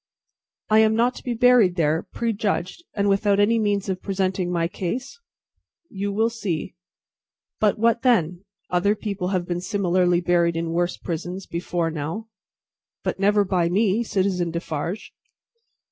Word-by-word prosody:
"I 215 0 +5
am 220 0 +4
not 240 +3 +2
to - - -10
be 245 -2 -2
buried 235 -6 +5
there, 160 -1 +1
prejudged, 210 - -2
and 200 -1 +1
without 200 0 +2
any 225 +3 +3
means 205 -2 0
of 185 -1 -3
presenting 190 -2 -1
my 170 -1 +1
case?" 250 - -5 0.7
"You 200 +1 -3
will 220 +3 +1
see. 190 -7 -3 0.9
But, 210 -2 +2
what 230 +1 +2
then? 180 -8 +2 0.3
Other 190 +4 +2
people 200 -4 -4
have 185 -2 -1
been 175 0 -3
similarly 180 -2 +1
buried 170 -1 +2
in 165 0 -2
worse 175 +1 0
prisons, 175 +3 -5
before 170 -1 -2
now." 165 +9 -5 0.7
"But - - -2
never 205 +1 +3
by 180 -3 +1
me, 205 +3 +2
Citizen 190 -5 0
Defarge." 170 +3 -4
190 Hz, 145 wpm, -23 LUFS, 175-215 Hz, 0.9 s, I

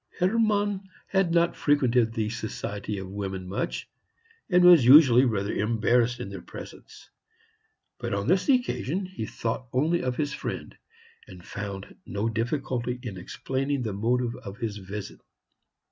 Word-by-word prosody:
Hermann 205 0 +1 0.2
had 190 -3 +2
not 170 0 +3
frequented 125 -6 +2
the 110 -2 -1
society 105 -2 -4
of 95 -1 -6
women 95 -1 -5
much, 95 - -3 0.6
and 180 -2 +5
was 175 -6 +9
usually 130 -1 +8
rather 105 -4 -1
embarrassed 115 +2 +1
in 110 - -5
their 100 - -7
presence. - - -11 0.9
But - - -4
on 100 0 -1
this 185 - +2
occasion 200 - +1
he 180 -12 -6
thought 115 +2 -3
only 155 +7 +1
of 125 -1 -2
his 145 -1 -1
friend, - - -5 0.5
and 90 -4 -13
found 100 -2 -6
no 105 +3 -2
difficulty 125 +1 -2
in 110 -6 -5
explaining 135 +8 -2
the 110 -3 -3
motive 120 +4 0
of 100 0 -9
his 110 -3 -3
visit. 100 +1 -7
120 Hz, 145 wpm, -27 LUFS, 105-155 Hz, 0.9 s, was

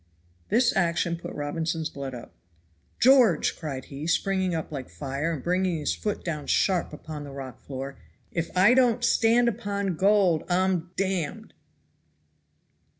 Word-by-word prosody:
This 235 +1 +3
action 170 -2 +1
put 170 - -8
Robinson's 160 +2 -2
blood 135 -2 -6
up. 120 - -10 0.7
"George," 245 - +5
cried 140 -5 -6
he, 145 +3 -7
springing 185 +1 +1
up 160 - -4
like 135 -4 -6
fire 140 +3 -3
and 150 -6 -4
bringing 180 0 +1
his 150 - -1
foot 210 -1 -4
down 150 -4 -4
sharp 185 -3 +1
upon 150 0 -8
the 145 - -8
rocky 135 -3 -8
floor, 135 0 -6 0.3
"IF 165 -1 -2
I 195 +6 +6
DON'T 245 -2 +3
STAND 235 +1 +4
UPON 200 -4 -2
GOLD 195 -4 +3
I'M 180 -1 +1
D 190 -5 0
D!" 220 0 -13
170 Hz, 150 wpm, -26 LUFS, 150-200 Hz, 0.7 s, I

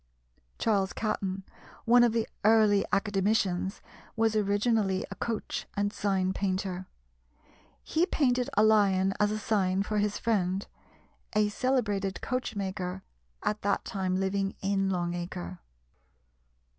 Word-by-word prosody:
Charles 200 -3 +1
Catton, 195 -3 -2 0.4
one 240 +1 +6
of 240 - +4
the 230 0 0 0.2
early 210 -2 +5
Academicians, 195 -2 0 0.3
was 225 -1 +2
originally 205 -1 +1
a - - -5
coach 225 -2 -3
and 205 0 0
sign 190 -2 0
painter. 185 -1 -2 1.0
He 335 +3 +1
painted 250 -8 +1
a 210 - +6
lion 195 -3 +4
as 210 - +3
a 215 - -1
sign 195 -3 +1
for 210 0 -1
his 205 0 0
friend, 195 -4 0 0.7
a 210 0 +3
celebrated 205 -5 0
coachmaker, 190 -6 -3 0.4
at 210 0 -1
that 200 - 0
time 190 -4 -1
living 195 +1 -1
in 195 0 0
Long 175 -2 -1
Acre. 90 - -5
200 Hz, 120 wpm, -29 LUFS, 190-215 Hz, 1.0 s, one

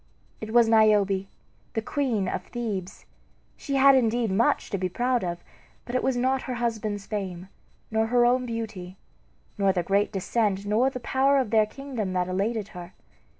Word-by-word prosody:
It 220 0 -6
was 235 0 +5
Niobe, 205 -3 +3 0.5
the 225 - -1
queen 240 -9 -1
of - - -3
Thebes. 210 -7 -5 0.5
She 275 - -4
had 275 0 +7
indeed 235 -3 +2
much 215 +5 +1
to 200 - -1
be 185 0 -1
proud 245 +4 0
of; 175 -1 -4 0.4
but 240 - -7
it 255 - +1
was 265 -2 0
not 260 +2 +1
her 255 - -4
husband's 220 -4 -2
fame, 190 -3 -5 0.4
nor 220 0 +1
her 240 +1 +3
own 250 +1 +2
beauty, 210 -6 -6 0.6
nor 195 -1 +4
their 180 -2 -1
great 200 +3 +1
descent, 200 0 -1
nor 220 +6 +2
the 255 - -6
power 270 +3 +2
of 255 -6 0
their 215 -1 +4
kingdom 235 -5 -5
that 180 -1 0
elated 200 +3 -2
her. 180 -1 -10
220 Hz, 175 wpm, -26 LUFS, 195-245 Hz, 0.6 s, had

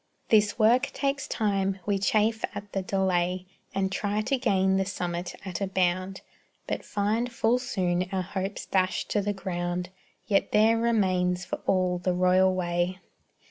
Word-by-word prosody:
This 210 -2 +4
work 240 +4 +4
takes 275 -1 -1
time; 195 -3 0
we 200 -1 +1
chafe 215 +3 +1
at 205 0 -7
the 195 - 0
delay 185 -1 0 0.3
And 190 -1 0
try 205 +2 -1
to 275 +6 0
gain 190 -4 +2
the 190 - +1
summit 175 -3 -4
at 185 0 -5
a 195 - 0
bound, 185 0 0 0.4
But - - -3
find 220 +4 -1
full 235 +1 +2
soon 185 -7 -1
our 190 -1 -1
hopes 195 +2 -4
dashed 185 -1 0
to 205 - +2
the 205 +1 -1
ground; 180 -2 -3 0.4
Yet 200 -2 +1
there 220 +2 +5
remains 185 -6 +1
for - - -3
all 185 -2 +2
the 180 +1 0
royal 185 +1 +4
way. 175 0 -1
190 Hz, 160 wpm, -27 LUFS, 180-210 Hz, 0.4 s, there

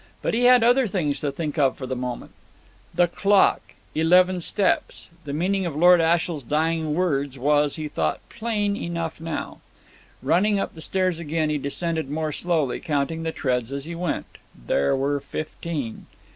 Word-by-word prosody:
But - - 0
he 240 +2 +2
had 250 -1 +7
other 245 +1 +4
things 150 -8 -1
to 145 - -1
think 150 +1 -4
of 135 -2 +2
for 130 - -6
the 130 0 -3
moment. 125 -1 -5 0.6
"The 175 0 +3
clock 200 +3 +2 0.2
eleven 180 +3 +4
steps." 190 0 -1
The 140 - -5
meaning 190 +6 0
of 160 - -5
Lord 175 +2 +6
Ashiel's 165 -1 +1
dying 155 +3 0
words 140 -6 0
was, 145 +2 +2
he 155 -1 -4
thought, 150 - -1
plain 215 -3 -1
enough 170 -4 -4
now. 165 -2 -5 0.6
Running 200 +4 +2
up - - -3
the 160 - -10
stairs 185 -1 0
again, 155 -1 -1
he 150 - 0
descended 160 +1 -2
more 155 +1 -2
slowly, 155 -5 0
counting 150 +2 -1
the 165 0 -2
treads 125 -5 -1
as 140 0 -4
he 170 - -6
went. 170 -1 -4 0.3
There 70 - +2
were 140 +2 0
fifteen. 150 -3 -5
160 Hz, 170 wpm, -24 LUFS, 145-180 Hz, 0.6 s, had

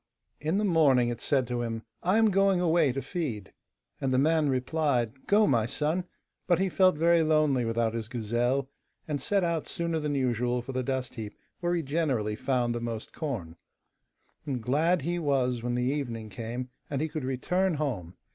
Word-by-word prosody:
In 160 +6 0
the 210 - +1
morning 140 -9 +4
it 120 - -4
said 135 -3 +2
to 120 0 -2
him, 115 -1 -3 0.2
'I 185 +5 +2
am 225 -1 +5
going 195 -1 +3
away 165 -5 +3
to 135 +2 -4
feed.' 135 - -4 0.5
And 135 - 0
the 130 - +2
man 155 +1 +3
replied, 130 -2 0
'Go, 210 +1 +5
my 115 - +2
son,' 155 +8 -1 0.4
but 175 -2 +4
he 190 +1 +1
felt 185 0 +4
very 170 +1 +4
lonely 155 -5 +2
without 115 0 0
his 115 -1 -3
gazelle, 120 +3 0 0.4
and 145 -3 -2
set 200 +6 +1
out 170 -2 -1
sooner 170 -1 -2
than 150 -1 -1
usual 125 -2 0
for 135 - -6
the 130 0 -1
dust 130 0 -2
heap 110 -2 -7 0.2
where 175 0 0
he 170 - -1
generally 135 -8 0
found 120 -1 0
most 115 -2 -5
corn. 105 - -4 0.9
And 135 -4 -3
glad 155 +6 +2
he 175 +3 -1
was 130 -6 +1
when 120 +1 -1
the 125 - 0
evening 115 -7 -4
came, 115 +5 -5 0.2
and 140 - -2
he 155 - 0
could 155 -2 -5
return 175 +8 0
home. 115 - -3
135 Hz, 185 wpm, -28 LUFS, 120-165 Hz, 0.9 s, am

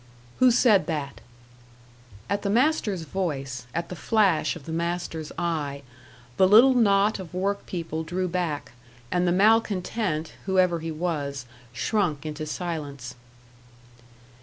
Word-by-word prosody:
"Who 255 - +6
said 230 -4 +4
that?" 150 -4 -4 1.1
At 200 0 -1
the 200 - -2
master's 230 - +1
voice 140 -8 -4
at 170 +4 -3
the 180 - -6
flash 195 +1 +2
of 155 -5 -11
the - - -6
master's 170 -1 -3
eye 150 -5 -2 0.5
the 190 - +6
little 235 +7 +7
knot 205 -3 +3
of 180 -2 -9
work 200 +2 -2
people 165 -3 -4
drew 180 +3 -2
back, 170 -5 -3 0.4
and 180 0 +1
the - - +3
malcontent, 195 -4 +1
whoever 185 -3 +3
he 165 +1 -5
was, 150 -5 -3 0.3
shrunk 160 - -1
into 155 0 -5
silence. 145 -7 -5
175 Hz, 130 wpm, -25 LUFS, 155-200 Hz, 1.1 s, little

